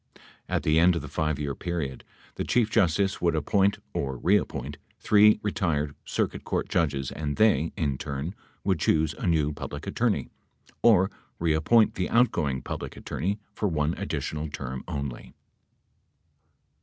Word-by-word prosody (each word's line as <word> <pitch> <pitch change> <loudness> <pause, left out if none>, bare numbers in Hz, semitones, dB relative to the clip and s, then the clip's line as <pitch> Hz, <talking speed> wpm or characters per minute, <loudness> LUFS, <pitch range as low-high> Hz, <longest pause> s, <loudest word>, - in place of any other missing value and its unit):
At - - 0
the 80 +1 +3
end 90 +1 +5
of 80 - -3
the - - -6
5 75 0 -1
year 70 -2 -2
period, 80 -6 -4 0.3
the - - -3
Chief 115 -3 +1
Justice 95 -2 +2
would 85 -2 +2
appoint 95 +6 +2 0.2
(or 65 -2 -2
reappoint) 75 -4 0 0.2
three 105 0 +5
retired 80 -8 0
circuit - - -2
court - - -2
judges 70 -4 0
and 75 -2 -3
they, 80 -8 +3
in 70 -5 -1
turn, 70 +5 -4 0.3
would 95 -4 +1
choose 80 0 +2
a - - -4
new 75 -3 +2
Public - - -7
Attorney, - - 0 0.5
or 100 -4 +5 0.3
reappoint 85 +8 +3
the 90 - -2
outgoing 75 - +2
Public - - -6
Attorney 95 +9 -2 0.2
for 105 - -1
one 80 -2 0
additional 75 0 -3
term 65 -3 -5
only. 70 -4 -5
80 Hz, 145 wpm, -27 LUFS, 75-95 Hz, 0.5 s, end